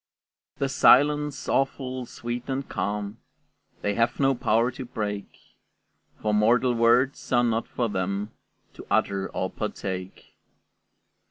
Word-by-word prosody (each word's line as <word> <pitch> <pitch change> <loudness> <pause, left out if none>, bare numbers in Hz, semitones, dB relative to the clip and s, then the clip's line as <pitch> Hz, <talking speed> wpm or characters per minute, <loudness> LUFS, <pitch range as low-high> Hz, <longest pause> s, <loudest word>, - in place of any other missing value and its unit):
The 140 - 0
silence, 145 +2 +4
awful, 130 -2 -1
sweet, 120 +2 -6
and 135 +1 -2
calm, 105 +2 -3 0.6
They 105 - +1
have 115 +2 0
no 135 -1 +4
power 115 0 +2
to 130 +1 -7
break; 105 -4 -4 1.0
For 105 - +1
mortal 120 +4 +3
words 120 +3 +2
are 120 -1 +4
not 115 -1 0
for 120 - -1
them 100 +1 -2 0.4
To - - -12
utter 95 -1 +1
or 95 - -3
partake. 95 -3 -5
115 Hz, 120 wpm, -26 LUFS, 105-130 Hz, 1.0 s, silence